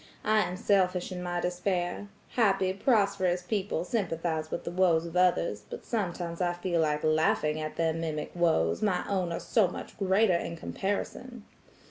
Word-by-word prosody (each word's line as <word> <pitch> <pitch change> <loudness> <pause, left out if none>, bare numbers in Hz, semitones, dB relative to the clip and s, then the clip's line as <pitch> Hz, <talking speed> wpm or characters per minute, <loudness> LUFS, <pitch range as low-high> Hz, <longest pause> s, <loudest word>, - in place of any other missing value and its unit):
I 215 0 +3
am 180 -2 -1
selfish 185 -2 +1
in 180 -1 -5
my 175 0 -2
despair. 180 +2 -2 0.2
Happy, 195 -5 +2
prosperous 200 -5 +2
people 195 -3 -1
sympathize 165 -6 -2
with - - -4
the - - -4
woes 175 -2 +3
of 170 0 -8
others, 175 - +2
but - - -8
sometimes 175 -5 -3
I 175 -1 +1
feel 175 -1 0
like 150 -1 0
laughing 155 0 +2
at 155 0 -5
their 165 -1 +1
mimic 160 -2 -3
woes, 160 - +2
my 185 -4 +1
own 185 -3 -1
are 170 - -2
so 215 -5 +2
much 175 - -8
greater 195 +1 +3
in 170 0 -2
comparison. 205 +6 -4
180 Hz, 165 wpm, -29 LUFS, 165-195 Hz, 0.2 s, I